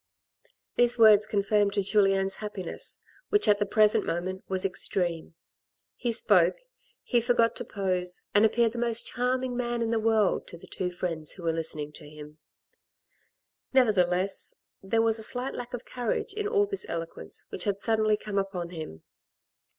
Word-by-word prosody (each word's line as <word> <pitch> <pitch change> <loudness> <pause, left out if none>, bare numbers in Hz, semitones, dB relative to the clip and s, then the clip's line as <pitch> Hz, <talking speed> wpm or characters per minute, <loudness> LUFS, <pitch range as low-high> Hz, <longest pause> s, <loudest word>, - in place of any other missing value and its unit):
These 245 0 +4
words 215 -2 +6
confirmed 205 0 +1
Julien's 195 -1 +2
happiness, 205 -4 -5 0.3
which 415 0 +3
at 205 -1 +4
the 205 - 0
present 215 +1 +4
moment 185 +3 -3
was 190 0 -1
extreme; 175 -4 -2 0.6
he 240 - -2
spoke, 185 -6 +4 0.5
he 240 -2 +1
forgot 235 -1 +2
to - - -3
pose, 185 -3 -2
and 205 - +5
appeared 230 +1 +3
the 235 - -6
most 235 -1 +1
charming 250 +1 0
man 240 -1 -1
in 225 - -1
the 230 - +1
world 220 -2 +1
to 170 - -10
the - - -14
two 180 -1 -4
friends 170 -3 -3
who 180 - -11
were 165 -1 +1
listening 155 -2 -3
to 145 - -10
him. 150 0 -12 1.3
Nevertheless, 190 -6 +1 0.3
there 225 +4 +1
was 225 0 +1
a - - -4
slight 250 +4 -1
lack 245 0 -6
of 245 -1 -6
courage 245 - -3
in 425 0 -2
all 415 -1 +2
this 400 -1 -3
eloquence 165 0 -5
which - - -5
had 200 -1 -1
suddenly 215 -1 +1
come 210 -1 -2
upon 190 -3 -4
him. 155 - -8
205 Hz, 165 wpm, -27 LUFS, 180-235 Hz, 1.3 s, words